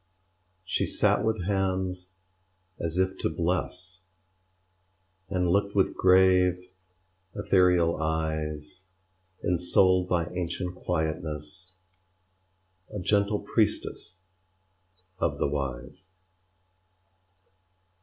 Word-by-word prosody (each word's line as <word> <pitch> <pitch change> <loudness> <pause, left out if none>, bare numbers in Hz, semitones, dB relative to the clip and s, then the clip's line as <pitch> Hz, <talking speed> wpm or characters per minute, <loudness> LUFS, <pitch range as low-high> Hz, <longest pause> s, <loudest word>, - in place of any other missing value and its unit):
She - - 0
sat - - +2
with 110 -4 0
hands 95 -1 -1 0.7
as 85 +1 -3
if 95 0 0
to - - 0
bless, 90 +2 -3 1.3
And 90 -2 0
looked 100 +3 +1
with 95 - +2
grave, 90 -1 +4 0.8
ethereal 90 -3 +3
eyes; 80 +1 -3 0.6
Ensouled 90 +1 +3
by 85 -2 +1
ancient 90 0 -3
quietness, 80 +1 -4 1.2
A 105 - -5
gentle 100 +2 +1
priestess 90 - -1 1.0
of - - 0
the - - 0
Wise. 70 +4 -5
90 Hz, 80 wpm, -27 LUFS, 80-95 Hz, 1.3 s, grave